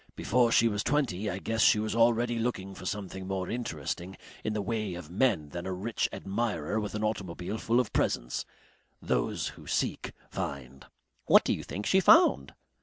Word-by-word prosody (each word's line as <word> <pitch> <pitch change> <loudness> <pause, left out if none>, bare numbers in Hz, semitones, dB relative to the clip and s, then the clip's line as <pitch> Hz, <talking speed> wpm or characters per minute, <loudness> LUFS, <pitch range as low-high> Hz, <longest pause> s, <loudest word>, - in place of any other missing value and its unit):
Before 120 -1 +2
she 115 - +5
was 105 -2 -1
twenty 115 -8 0
I 95 - -3
guess 110 +4 -2
she - - +6
was 110 +1 -1
already 115 +1 +3
looking 95 -5 -2
for 90 - -8
something 95 -2 -5
more 95 -1 -3
interesting 95 - -4 0.3
in 110 - -1
the 105 - -1
way 105 -3 -2
of 85 -2 -9
men 95 - +1
than 85 +4 -6
a - - -2
rich 105 +5 -1
admirer 100 -3 -2
with 105 -1 -4
an 105 - -2
automobile 100 -1 -3
full 115 +3 +2
of 125 -5 -1
presents. - - 0 0.6
Those - - -1
who - - -13
seek - - -1 0.2
find." 65 -1 -6 0.4
"What - - +7
do - - +1
you - - -4
think 100 +2 -5
she 190 - +4
found?" 70 - +5
105 Hz, 180 wpm, -29 LUFS, 90-115 Hz, 0.6 s, What